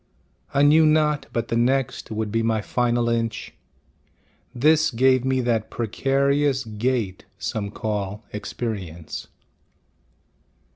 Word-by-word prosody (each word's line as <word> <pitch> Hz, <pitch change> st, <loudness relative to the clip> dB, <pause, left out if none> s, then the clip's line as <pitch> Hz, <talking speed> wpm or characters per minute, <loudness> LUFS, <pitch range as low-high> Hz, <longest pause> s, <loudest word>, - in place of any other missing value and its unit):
I 140 Hz, 0 st, +3 dB
knew 155 Hz, +2 st, +6 dB
not 150 Hz, -1 st, +2 dB
but 115 Hz, -1 st, -2 dB
the 115 Hz, -, 0 dB
next 130 Hz, +2 st, 0 dB
Would 110 Hz, -1 st, -3 dB
be 115 Hz, +1 st, +1 dB
my 115 Hz, -1 st, +1 dB
final 120 Hz, +1 st, 0 dB
inch, 115 Hz, -2 st, -2 dB, 1.0 s
This 155 Hz, +5 st, +4 dB
gave 130 Hz, +1 st, +3 dB
me 130 Hz, 0 st, +1 dB
that 115 Hz, -3 st, 0 dB
precarious 135 Hz, +3 st, +1 dB
gait 110 Hz, -3 st, -2 dB
Some 105 Hz, -1 st, -3 dB
call 105 Hz, 0 st, -4 dB
experience. 100 Hz, -6 st, -5 dB
120 Hz, 110 wpm, -23 LUFS, 110-135 Hz, 1.0 s, knew